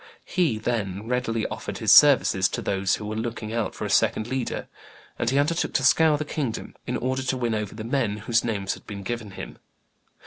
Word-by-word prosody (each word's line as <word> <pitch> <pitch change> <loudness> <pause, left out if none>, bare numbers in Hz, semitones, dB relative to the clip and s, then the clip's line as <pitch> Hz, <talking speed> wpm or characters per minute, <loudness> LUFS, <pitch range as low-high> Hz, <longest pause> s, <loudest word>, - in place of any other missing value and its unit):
He, 165 - +1
then, 110 -3 -3
readily 115 -2 -1
offered - - -5
his - - +2
services - - +6
to - - -3
those 95 -1 +1
who 105 - -7
were 105 +1 -4
looking 110 -1 -4
out 115 -2 -2
for - - -4
a - - -3
second 110 - +2
leader, 130 -1 -3 0.5
and 120 - +1
he 135 - +1
undertook 155 +4 +1
to 135 - +1
scour 155 +3 +5
the 155 - -3
kingdom 140 -6 -4
in - - -1
order 130 +1 -1
to 130 0 -1
win 120 -2 -1
over 105 -2 -3
the 110 - -6
men 115 -3 0
whose 115 +2 +1
names 100 -4 -1
had - - -13
been 100 -2 -7
given 115 0 -4
him. 95 - -9
115 Hz, 210 wpm, -25 LUFS, 105-130 Hz, 0.5 s, services